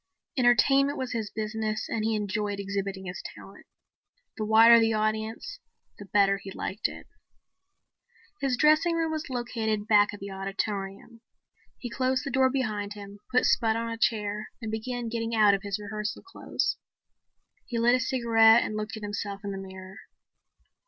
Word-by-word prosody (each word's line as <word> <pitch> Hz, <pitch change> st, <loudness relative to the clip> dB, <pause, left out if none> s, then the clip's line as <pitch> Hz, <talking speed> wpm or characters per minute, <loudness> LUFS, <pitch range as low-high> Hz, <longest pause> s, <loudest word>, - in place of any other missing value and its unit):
Entertainment 270 Hz, +3 st, +4 dB
was 260 Hz, -1 st, -3 dB
his 225 Hz, -3 st, -3 dB
business 215 Hz, 0 st, -3 dB
and 220 Hz, -, -2 dB
he 220 Hz, 0 st, +1 dB
enjoyed 205 Hz, 0 st, -2 dB
exhibiting 195 Hz, -1 st, -4 dB
his 180 Hz, 0 st, -6 dB
talent. -, -, -14 dB, 0.7 s
The 215 Hz, -, -3 dB
wider 225 Hz, +2 st, +7 dB
the 225 Hz, 0 st, +2 dB
audience 220 Hz, -, -2 dB, 0.4 s
the 205 Hz, -, -8 dB
better 195 Hz, 0 st, +3 dB
he 195 Hz, -, -9 dB
liked 195 Hz, +2 st, -3 dB
it. -, -, -10 dB, 1.3 s
His 265 Hz, -3 st, 0 dB
dressing 310 Hz, +4 st, +4 dB
room 325 Hz, -1 st, 0 dB
was 315 Hz, -2 st, -4 dB
located 225 Hz, -4 st, -2 dB
back 205 Hz, -1 st, +5 dB
of 205 Hz, -, -9 dB
the 200 Hz, 0 st, -7 dB
auditorium. 195 Hz, +3 st, -5 dB, 0.6 s
He 245 Hz, -, -6 dB
closed 260 Hz, +1 st, 0 dB
the 275 Hz, -, -3 dB
door 260 Hz, 0 st, +4 dB
behind 215 Hz, -6 st, -2 dB
him, 205 Hz, 0 st, -11 dB
put 250 Hz, 0 st, +2 dB
Spud 225 Hz, -2 st, +3 dB
on 230 Hz, 0 st, -2 dB
a -, -, -3 dB
chair 215 Hz, -2 st, -1 dB
and 225 Hz, -3 st, -5 dB
began 240 Hz, +2 st, -4 dB
getting 230 Hz, 0 st, -2 dB
out 210 Hz, -2 st, +5 dB
of 195 Hz, -, 0 dB
his 200 Hz, 0 st, -3 dB
rehearsal 210 Hz, 0 st, -5 dB
clothes. 380 Hz, -, -3 dB, 0.9 s
He 240 Hz, -, -3 dB
lit 235 Hz, +1 st, +4 dB
a 255 Hz, -, +3 dB
cigarette 230 Hz, -2 st, +5 dB
and 215 Hz, -, -4 dB
looked 215 Hz, +1 st, -4 dB
at 215 Hz, -, -9 dB
himself 205 Hz, -1 st, -4 dB
in 200 Hz, -, -4 dB
the 195 Hz, -, -5 dB
mirror. 190 Hz, 0 st, -10 dB
220 Hz, 165 wpm, -27 LUFS, 205-240 Hz, 1.3 s, wider